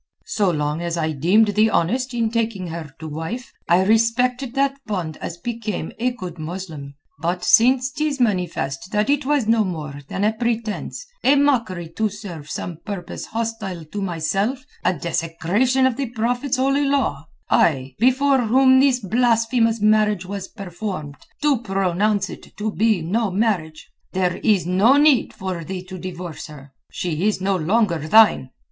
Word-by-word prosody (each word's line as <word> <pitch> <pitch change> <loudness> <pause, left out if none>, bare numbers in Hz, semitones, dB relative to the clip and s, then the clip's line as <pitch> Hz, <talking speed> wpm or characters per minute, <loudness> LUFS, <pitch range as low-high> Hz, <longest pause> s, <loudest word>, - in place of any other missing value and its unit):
"So 205 -3 +1
long 150 -1 -1
as 170 0 -2
I 160 -1 0
deemed 185 +9 +3
thee 215 +2 +3
honest 250 +9 0
in 230 -2 0
taking 225 -5 -1
her 165 -2 -6
to 160 - -8
wife 165 +11 -6 0.2
I 175 +2 +5
respected 240 +4 +1
that 275 0 +1
bond 175 -7 -3
as 170 - -6
became 215 -4 -4
a 250 +2 +2
good 185 -9 -8
Muslim; 155 -4 -7 0.2
but 175 +3 -2
since 255 +3 +4
'tis 300 0 -2
manifest 180 - -1
that 210 +5 +2
it 290 -2 0
was 290 -5 +2
no 225 -1 +4
more 150 -6 -5
than 190 - -3
a 215 +1 +3
pretence, 230 - -3 0.2
a 280 - +5
mockery 235 - +1
to 220 -1 +1
serve 180 -7 -9
some 170 +1 -5
purpose 200 -5 -6
hostile 220 -7 -4
to 200 +7 -6
myself, 195 - -1 0.2
a - - +3
desecration 170 - 0
of 260 -3 +1
the 275 -4 -2
Prophet's 245 +3 -1
Holy 275 +2 +2
Law, 260 - 0 0.2
I, 135 -4 +2
before 260 +3 +3
whom 260 +3 +5
this 265 -2 +3
blasphemous 230 +1 +2
marriage 210 -3 +3
was 195 0 -5
performed, 185 -7 -6 0.3
do 290 -5 +3
pronounce 195 0 0
it - - -12
to 210 +1 -2
be 215 -5 +1
no 210 +6 0
marriage. 180 -6 -1 0.2
There 185 -2 0
is 205 -6 +2
no 200 +10 +4
need 290 -4 +4
for 185 -3 -5
thee 185 +2 -5
to 185 0 -9
divorce 175 -3 -7
her. 140 -2 -13 0.2
She 175 +2 -1
is 215 - 0
no 195 +1 0
longer 185 +1 +1
thine. 210 -8 +5
205 Hz, 165 wpm, -21 LUFS, 175-235 Hz, 0.3 s, I